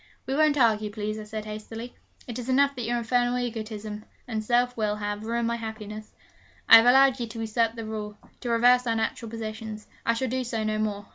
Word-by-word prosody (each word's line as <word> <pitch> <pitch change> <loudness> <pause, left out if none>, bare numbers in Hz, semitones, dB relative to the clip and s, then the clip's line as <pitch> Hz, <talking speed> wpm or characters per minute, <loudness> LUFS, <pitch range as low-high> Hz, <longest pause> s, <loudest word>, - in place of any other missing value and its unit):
'We 265 - -2
won't 300 0 +3
argue, 215 -4 +3
please,' 215 0 -4
I 215 - -7
said 215 0 -6
hastily. 225 +3 -7 0.3
'It 240 0 -6
is 245 +1 -6
enough 280 +2 +3
that 245 -3 -4
your 240 +1 0
infernal 245 +1 +1
egotism 215 -3 -5 0.2
and 220 -3 -3
self 245 +2 +2
will 215 -2 0
have 205 0 -4
ruined 235 0 0
my 235 0 -1
happiness. 215 -1 -7 0.5
I - - +11
have 225 +1 +5
allowed 265 +1 +6
you 235 - -2
to 225 +1 -8
usurp 225 +1 0
the 225 -1 -6
rule, 210 -1 -5 0.2
to 245 - -5
reverse 245 +2 +4
our 230 - +1
natural 225 0 -2
positions. 220 -1 -6 0.2
I 230 - +2
shall 260 +3 -1
do 255 +1 -1
so 230 -2 -2
no 215 0 -1
more. 205 -1 -2
225 Hz, 215 wpm, -26 LUFS, 215-245 Hz, 0.5 s, I